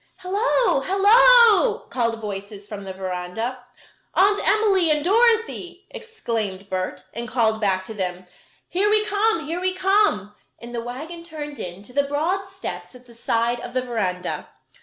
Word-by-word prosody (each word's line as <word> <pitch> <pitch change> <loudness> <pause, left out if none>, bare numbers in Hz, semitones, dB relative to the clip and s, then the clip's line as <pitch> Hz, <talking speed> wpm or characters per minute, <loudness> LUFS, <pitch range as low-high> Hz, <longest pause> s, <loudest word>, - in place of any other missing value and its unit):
"Hello! 420 +6 +1
Hello!" 455 +3 +6
called 230 -2 -1
voices 205 -1 -7
from 205 -2 -8
the 190 - -5
veranda. 190 +7 -4 0.5
"Aunt 400 +2 +4
Emily 400 -5 +3
and 300 0 +1
Dorothy!" 450 -3 +1
exclaimed 230 - -5
Bert, 185 0 -3
and 235 +1 -5
called 220 -3 +1
back 190 -2 0
to 220 - -7
them: 185 -3 -4 0.4
"Here 390 +4 +1
we 425 0 +3
come! 415 -5 +1
Here 335 +4 -3
we 370 0 -1
are!" 375 - +2 0.2
and 235 0 -10
the 235 - -3
wagon 305 +9 -7
turned 300 -3 -8
in 180 +2 -7
to 250 - -14
the 285 - +3
broad 320 +8 -1
steps 380 - -8
at 250 0 -15
the 240 - -17
side 235 +1 -1
of 245 - -9
the 255 - +1
veranda. 185 -7 -3
265 Hz, 160 wpm, -23 LUFS, -, 0.5 s, Hello